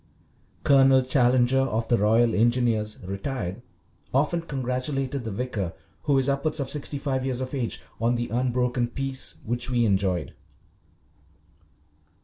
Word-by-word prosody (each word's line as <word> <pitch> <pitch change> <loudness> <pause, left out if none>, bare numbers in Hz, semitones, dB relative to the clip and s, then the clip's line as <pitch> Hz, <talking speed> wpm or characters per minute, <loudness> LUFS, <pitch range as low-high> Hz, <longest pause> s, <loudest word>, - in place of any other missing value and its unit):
Colonel 135 -1 +5
Challenger, 125 0 +3
of 115 -4 0
the 120 - +3
Royal 115 +3 +3
Engineers, 115 -2 +2
retired, 100 0 -4 0.5
often 150 +5 +2
congratulated 135 -2 -3
the - - -2
vicar, 100 -5 -3 0.3
who 140 -2 +3
is 135 0 +1
upwards 140 +3 0
of 135 -2 -2
sixty 145 0 -4
five 135 -2 -2
years 130 -2 -2
of 130 +1 -5
age, 125 -5 -2 0.2
on 115 +2 +2
the 120 0 -2
unbroken 125 +1 0
peace 135 +2 -2
which 120 +2 0
we 120 -2 +2
enjoyed. 95 -4 0
125 Hz, 130 wpm, -25 LUFS, 115-135 Hz, 0.5 s, Colonel